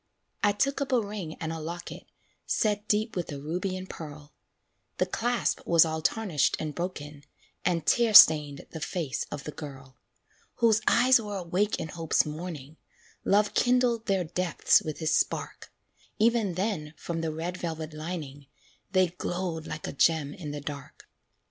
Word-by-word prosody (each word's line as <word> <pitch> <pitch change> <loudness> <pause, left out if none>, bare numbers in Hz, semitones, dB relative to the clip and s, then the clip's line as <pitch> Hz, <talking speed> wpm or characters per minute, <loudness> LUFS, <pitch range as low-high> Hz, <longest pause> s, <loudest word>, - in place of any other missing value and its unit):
I 205 - +5
took 275 +8 0
up 280 - -2
a 250 - +4
ring 200 -7 -5
and 160 0 -4
a 165 - -5
locket, 170 +3 -7 0.4
Set 210 -1 0
deep 215 +3 0
with 175 -2 -3
a 140 - -5
ruby 180 +6 -3
and 185 0 -7
pearl; 150 -3 -9 0.6
The - - +2
clasp 240 -1 -1
was 170 -1 +6
all 160 0 -3
tarnished 185 -5 +1
and 155 -1 -3
broken, 150 -5 -5 0.4
And 170 -3 0
tear 230 -3 +3
stained 150 -5 +8
the 160 - -6
face 155 -3 -3
of 145 -1 -6
the 150 - -6
girl, 135 -4 -10 0.6
Whose 225 -2 +3
eyes 250 0 +5
were 205 -2 -5
awake 185 +4 0
in 160 - -4
Hope's 165 0 +1
morning, 155 -2 -7 0.5
Love 205 +1 +3
kindled 245 -2 +2
their 195 -2 +2
depths 175 +1 +2
with 155 -1 -5
his 160 -1 0
spark - - -1 0.5
Even 225 -5 +2
then, 180 -6 -2
from 165 -1 -4
the 160 -1 -2
red 170 +3 -4
velvet 160 -2 -5
lining, 155 -3 -6 0.5
They 185 -2 +4
glowed 175 -2 -4
like 150 - -6
a - - -5
gem 150 -1 +2
in 155 -5 -7
the 145 0 -5
dark. 140 -1 -8
170 Hz, 165 wpm, -28 LUFS, 155-205 Hz, 0.6 s, stained